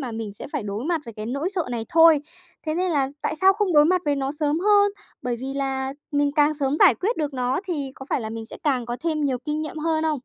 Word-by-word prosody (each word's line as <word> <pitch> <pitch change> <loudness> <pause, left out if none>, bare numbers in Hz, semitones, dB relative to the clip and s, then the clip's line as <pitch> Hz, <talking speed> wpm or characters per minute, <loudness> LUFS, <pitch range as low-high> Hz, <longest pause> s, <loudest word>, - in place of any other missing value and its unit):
mà 255 -4 -4
mình 220 -2 -5
sẽ - - -6
phải 295 -5 -2
đối 205 +3 -4
mặt 335 0 0
với 230 -3 -9
cái 215 0 -6
nỗi 280 +9 -2
sợ 360 - +1
này 230 -2 -3
thôi. 325 -2 +6 0.5
Thế 310 - 0
nên 365 +2 0
là 280 -4 +1
tại 315 - -1
sao 380 +3 +5
không 405 -2 0
đối 295 -1 +7
mặt 365 +3 +3
với 290 -1 +1
nó 275 0 -2
sớm 300 0 0
hơn? 410 +1 +5 0.3
Bởi 245 -1 -1
vì 270 +1 -4
là 270 -1 -2 0.2
mình 285 0 +2
càng 300 0 +3
sớm 285 -1 0
giải - - +7
quyết 440 +6 -1
được 295 -3 -2
nó 255 +3 0
thì 290 -8 -3
có 265 - -10
phải - - +1
là 220 - -5
mình 225 0 -6
sẽ - - -9
càng 260 -6 0
có 240 0 -3
thêm 320 -2 -1
nhiều 265 -3 0
kinh 300 0 -2
nghiệm 310 - -6
hơn 315 0 0
không? 310 -1 +1
290 Hz, 280 wpm, -24 LUFS, 265-325 Hz, 0.5 s, đối